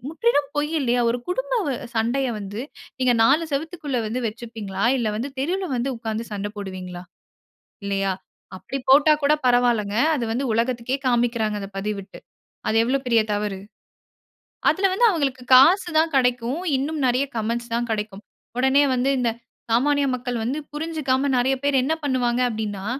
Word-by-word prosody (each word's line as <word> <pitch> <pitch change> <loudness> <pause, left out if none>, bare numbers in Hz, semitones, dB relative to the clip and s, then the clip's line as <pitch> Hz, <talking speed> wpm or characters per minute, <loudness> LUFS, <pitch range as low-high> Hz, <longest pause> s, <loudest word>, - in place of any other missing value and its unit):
முற்றிலும் 325 -3 +1
பொய் 295 +1 0
இல்லயா! 245 -2 +1
ஒரு 240 - -1
குடும்ப - - -2 0.3
அ - - -6
சண்டைய 245 +4 +1
வந்து 205 +2 -6 0.4
நீங்க 255 -1 +3
4 280 +8 +4
செவுத்துக்குள்ள 295 -2 -3
வந்து 225 +4 -2
வச்சுப்பீங்களா! 215 -3 -5
இல்ல 230 -3 0
வந்து 245 +6 -3
தெருவுல 365 +8 -1
வந்து 245 +2 -1
உட்கார்ந்து 225 0 -4
சண்ட 205 0 -3
போடுவீங்களா! 185 -3 -7 0.8
இல்லயா? 195 -1 0 0.4
அப்டி 190 +9 -5
போட்டா 290 +3 +7
கூட 285 +2 +4
பரவாயில்லங்க. 240 -4 +2 0.2
அது 245 -5 -2
வந்து 245 +4 -1
உலகத்துக்கே 235 +2 0
காண்பிக்கிறாங்க 235 -3 +1
அந்த 195 - -6
பதிவிட்டு. 200 -1 -5 0.5
அது 220 - +1
எவ்வளவு 265 +3 -1
பெரிய 230 -2 +4
தவறு. 205 -2 -2 1.1
அதில 390 - +1
வந்து 475 +6 +3
அவுங்களுக்கு 275 -8 -1
காசு 350 +8 +6
தான் 320 0 +1
கிடைக்கும். 250 +3 0 0.2
இன்னும் 300 +4 -2
நெறைய 250 +3 +2
கமெண்ட்ஸ் 235 +2 -2
தான் 240 +1 -1
கிடைக்கும். 210 -1 -4 0.3
உடனே 265 +3 +4
வந்து 255 +2 +1
இந்த 240 -2 +1 0.4
சாமானிய 285 +5 +3
மக்கள் 245 -1 -4
வந்து 265 +7 -2
புரிஞ்சிக்காம 295 -4 -1
நெறைய 260 +2 +2
பேரு 285 -1 +2
என்ன 295 +5 +1
பண்ணுவாங்க 250 -3 +1
அப்டின்னா, 210 -3 -4
245 Hz, 150 wpm, -23 LUFS, 220-280 Hz, 1.1 s, போட்டா